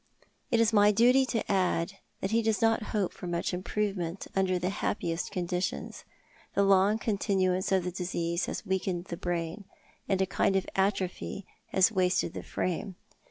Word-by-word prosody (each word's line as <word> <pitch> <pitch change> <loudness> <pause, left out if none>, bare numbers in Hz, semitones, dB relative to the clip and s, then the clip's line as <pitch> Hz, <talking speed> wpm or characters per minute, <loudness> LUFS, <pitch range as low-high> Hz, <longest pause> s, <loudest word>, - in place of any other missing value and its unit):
"It 235 - +2
is 230 -1 +3
my 205 0 +6
duty 250 +5 +4
to 230 -3 -1
add 190 0 0 0.2
that 190 - -2
he 230 +1 +3
does 220 -2 +1
not 225 -1 +2
hope 205 -4 -1
for 180 - -8
much 175 +1 -1
improvement 185 -1 -2
under 190 -1 +2
the 180 +1 -1
happiest 170 -4 -2
conditions. 180 -2 -3 0.5
The 200 - +4
long 195 +2 +4
con 220 -3 -1
tinuance 185 -2 +1
of 190 -2 +3
the 180 - -3
disease 175 -1 -2
has - - -4
weakened 185 -2 -1
the 175 - -5
brain, 175 +3 -3 0.4
and 195 -2 +2
a 190 - +3
kind 195 +1 +1
of 190 - +1
atrophy 195 0 -1 0.2
has 190 +3 +4
wasted 185 -4 +1
the - - -5
frame. 185 +2 -3
190 Hz, 170 wpm, -29 LUFS, 180-205 Hz, 0.5 s, my